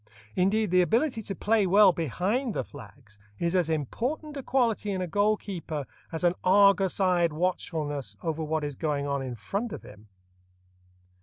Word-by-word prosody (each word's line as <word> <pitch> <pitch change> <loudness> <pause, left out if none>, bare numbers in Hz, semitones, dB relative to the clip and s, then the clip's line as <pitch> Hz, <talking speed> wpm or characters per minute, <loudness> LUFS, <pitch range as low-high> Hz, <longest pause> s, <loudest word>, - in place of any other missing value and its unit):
Indeed, 200 +2 +2
the 180 0 +5
ability 230 - +1
to 195 -2 -5
play 215 -2 +2
well 200 +1 +7
"behind 190 - -1
the - - -1
flags" 105 -4 -14 0.2
is 170 - -1
as 175 -3 +2
important 245 - -2
a 275 - -4
quality 240 -5 0
in 190 -2 -1
a 185 - -1
goal 205 +5 +2
keeper 165 -8 -5 0.3
as 160 +1 -4
an 175 -1 +4
argus 195 0 +4
eyed 180 -3 +3
watchfulness 150 - -2
over 160 -1 -2
what 155 0 -1
is 145 -1 -4
going 145 -2 -1
on 140 -1 -1
in 130 -2 -5
front 200 - -4
of - - -7
him. 105 +1 -14
180 Hz, 170 wpm, -27 LUFS, 150-205 Hz, 0.3 s, well